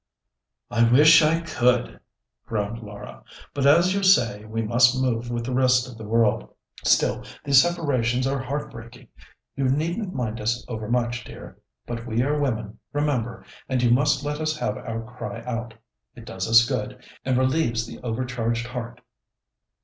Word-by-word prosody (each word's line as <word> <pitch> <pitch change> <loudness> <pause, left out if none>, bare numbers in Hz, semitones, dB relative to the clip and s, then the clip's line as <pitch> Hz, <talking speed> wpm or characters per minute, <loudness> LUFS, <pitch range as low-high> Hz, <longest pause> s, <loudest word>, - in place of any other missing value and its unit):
"I 115 - +3
wish 155 +5 +7
I 160 +2 +2
could," 125 -7 0 0.5
groaned 110 +1 -3
Laura; 105 -1 -10 0.3
"but 140 -1 +1
as 170 +6 +5
you 200 - -1
say, 115 - +3
we 115 +1 -3
must 120 +3 +3
move 120 -2 -1
with 120 -1 -3
the 130 - -3
rest 130 -1 +3
of 125 - -10
the 110 - -8
world. 115 -1 +1 0.3
Still - - +2 0.2
these 140 -2 +6
separations 130 -8 0
are 135 +1 -1
heart 140 +3 -4
breaking. 120 +1 -12 0.5
You 135 - -1
needn't 170 - -1
mind 115 -3 -3
us 115 +3 -1
overmuch, 120 +2 -2
dear; - - -12 0.3
but 115 0 -6
we 120 +1 0
are 145 +2 0
women, 110 -7 -3
remember, 130 -6 -2 0.2
and 130 -2 0
you 120 - +3
must 145 +3 +2
let 150 +1 -3
us 155 0 -1
have 105 -8 -2
our 115 -1 -5
cry 115 0 -8
out. 115 -2 -5 0.4
It 115 -2 -12
does 95 -1 -5
us 115 +1 +6
good, 125 -1 -4 0.2
and 130 -1 0
relieves 130 -3 +1
the - - -10
overcharged 120 -1 -2
heart." 120 -1 -7
125 Hz, 165 wpm, -24 LUFS, 115-140 Hz, 0.5 s, wish